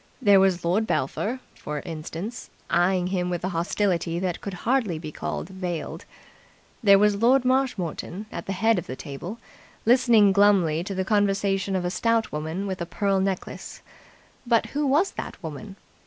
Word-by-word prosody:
There 205 -6 +6
was 185 -3 +2
Lord 205 +6 +1
Belpher, 245 +5 -1
for 150 0 -5
instance, 165 +7 -6 0.2
eyeing 180 +2 +3
him 180 -1 0
with 175 -1 -3
a 185 - 0
hostility 170 -1 0
that 180 -1 -2
could 200 -2 -5
hardly 230 -9 +1
be 155 -1 -7
called - - -4
veiled. 180 -3 -5 0.8
There 200 -4 +7
was 205 0 +3
Lord 255 +2 +4
Marshmoreton 220 - -1
at - - -6
the 195 - -1
head 220 +2 +2
of 175 - -9
the 130 - -5
table, 165 - -7 0.5
listening 230 -4 +5
glumly 190 -5 +3
to 195 - -4
the 190 0 -1
conversation 195 -1 +1
of 180 -1 -1
a 175 - -1
stout 230 +3 +1
woman 160 +6 -3
with 190 -2 -4
a 170 - -3
pearl 195 +2 0
necklace, 190 -1 -4 0.6
but 235 -3 +2
who 290 0 0
was 305 +9 +3
that - - -6
woman? 180 +6 -7
195 Hz, 170 wpm, -25 LUFS, 175-215 Hz, 0.8 s, There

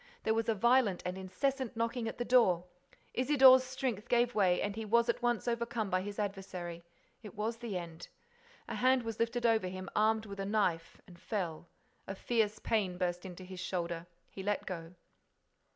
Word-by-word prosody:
There 220 - +2
was 225 +1 0
a 225 - +2
violent 235 -3 +3
and 180 0 -2
incessant 230 +7 -2
knocking 230 0 -1
at - - -5
the 240 - -2
door. 195 -9 +4 0.5
Isidore's 260 -1 +7
strength 255 -4 -3
gave 240 0 +3
way 185 -4 +3
and 205 0 -2
he 225 - -4
was 235 +2 +3
at 235 - 0
once 240 -1 0
over 235 0 0
come 220 -4 -3
by 185 0 +2
his 205 +1 -6
adversary. 190 -4 -4 0.4
It 215 -1 -11
was 220 +2 -2
the 225 -5 -4
end. 165 -2 -8 0.6
A - - -5
hand 255 0 +3
was 225 -1 -5
lifted 235 +1 0
over 225 -5 +3
him, 185 +1 -6
armed 220 +1 +2
with 200 -1 -8
a - - -1
knife, 195 -6 0
and 175 -2 -15
fell. 175 -4 -4 0.4
A 195 - -4
fierce 215 0 0
pain 200 -5 0
burst 180 0 -2
into 185 0 -9
his 185 0 -9
shoulder. 170 -2 -3 0.2
He 195 - -7
let 205 +1 -1
go. 170 -1 -6
210 Hz, 190 wpm, -33 LUFS, 185-235 Hz, 0.6 s, Isidore's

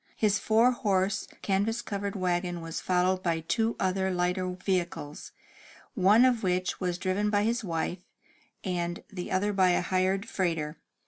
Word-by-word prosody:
His 210 -2 +2
four 225 +3 +4
horse 195 -5 0 0.2
canvas 210 +4 0
covered 200 0 -3
wagon 175 -2 -1
was 165 0 -5
followed 185 0 +1
by 165 -3 0
two 225 +7 0
other 190 0 +1
lighter 180 0 0
vehicles, 180 -5 -3 0.6
one 215 +2 +5
of 245 -3 +2
which 185 -1 0
was 180 -2 -1
driven 190 +3 0
by 205 -1 +2
his 230 +2 0
wife, 175 0 -2 0.6
and 175 -2 -2
the 180 -2 -5
other 205 +2 +1
by 190 -2 +4
a 175 - +3
hired 185 +2 0
freighter. 165 -4 -2
185 Hz, 150 wpm, -28 LUFS, 180-205 Hz, 0.6 s, one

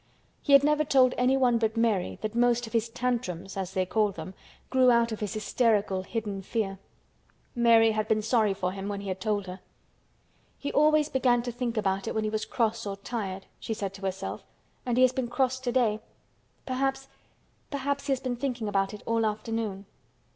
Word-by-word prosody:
He 285 - +1
had 275 0 +8
never 300 +1 +3
told 260 -3 +4
anyone 250 -2 +3
but 220 0 0
Mary 220 -5 +1
that 215 0 -2
most 240 0 +2
of 225 - -11
his 230 0 +1
"tantrums" 230 -7 -3
as 190 -1 -4
they 185 -1 +1
called 210 0 +1
them 165 +3 -7 0.4
grew 260 -1 +5
out 235 -1 +3
of 220 - -4
his 210 -2 -3
hysterical 210 -3 +1
hidden 205 -1 -4
fear. 195 -1 -3 0.7
Mary 230 -2 +5
had 215 0 -1
been 215 -1 +1
sorry 220 -3 +2
for 185 -2 -2
him 195 +1 -5
when 200 -1 -4
he 200 - -6
had 185 0 -4
told 205 -1 0
her. 185 +1 -8 1.0
"He 285 - -4
always 305 0 +4
began 250 -4 +2
to 245 - -3
think 240 -1 -3
about 195 -2 0
it - - -3
when 220 - 0
he 215 - -1
was 215 0 -2
cross 225 -1 -1
or 200 - -3
tired," 195 -3 -5
she 225 - -4
said 195 -2 -4
to 190 - -11
herself. 190 0 -4 0.4
"And 245 -1 0
he 255 - +6
has 255 - +6
been 255 -2 -2
cross 260 +1 0
today. 245 -4 +1 0.7
Perhaps—perhaps 270 +1 -4
he - - 0
has 265 - +1
been 255 -2 -3
thinking 245 -4 -2
about 195 0 0
it 210 - -13
all 230 0 +1
afternoon." 215 -2 -2
225 Hz, 195 wpm, -28 LUFS, 200-250 Hz, 1.0 s, had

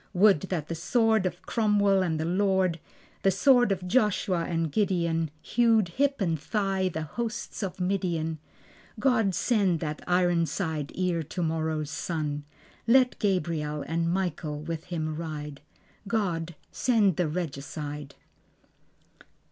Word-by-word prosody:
Would 195 -2 +6
that 160 -5 -2
the - - -3
sword 220 +4 +2
of - - -7
Cromwell 205 -3 +2
and 165 -4 0
the 160 - -1
Lord, 185 -1 +1 0.4
The 195 - +4
sword 245 +4 +4
of 185 -2 -2
Joshua 190 -5 +1
and 165 -2 -1
Gideon, 170 -5 +1
Hewed 225 -5 +3
hip 275 +9 0
and 165 -5 +1
thigh 195 +2 0
the 160 -2 -4
hosts 225 +11 -4
of 190 -2 -4
Midian. 175 -4 -1 0.6
God 225 -8 +2
send 200 -8 +2
that 155 -2 -3
ironside 170 -3 +1
ere 180 -2 +1
tomorrow's 160 -2 -2
sun; 150 -3 -3 0.4
Let 250 +1 +4
Gabriel 165 -7 -1
and 165 +1 0
Michael 160 -5 -2
with 165 0 -5
him 155 -3 -3
ride. 150 -3 -6 0.5
God 175 -6 -1 0.2
send 215 -9 +2
the 175 - +1
Regicide. 150 -2 -5
175 Hz, 125 wpm, -27 LUFS, 160-200 Hz, 0.6 s, Would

